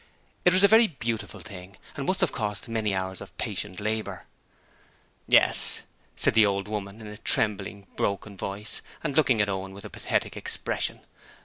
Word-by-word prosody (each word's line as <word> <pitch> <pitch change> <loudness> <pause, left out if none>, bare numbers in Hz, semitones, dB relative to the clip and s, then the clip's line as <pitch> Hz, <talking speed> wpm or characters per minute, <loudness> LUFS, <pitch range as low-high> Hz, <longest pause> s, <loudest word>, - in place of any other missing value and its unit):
It 180 - +7
was 185 +1 +4
a - - +10
very 225 +2 +7
beautiful 115 - -4
thing 95 -2 -10 0.2
and 140 - -4
must 185 - +1
have - - +3
cost 105 -3 -3
many 110 -3 0
hours 95 -1 -2
of - - -11
patient 100 -2 -3
labour. 105 -3 -2 1.0
'Yes,' - - +4 0.3
said - - +2
the 110 0 +7
old 100 -1 +1
woman, 105 0 -5
in - - -9
a 105 0 -8
trembling, 100 -2 +1
broken 100 +1 -1
voice, 100 +3 -5 0.2
and 150 -4 -2
looking 130 -8 +4
at 105 - +2
Owen 95 -1 -3
with 100 +2 -10
a 105 - -8
pathetic - - -1
expression. - - 0
105 Hz, 175 wpm, -27 LUFS, 100-115 Hz, 1.0 s, a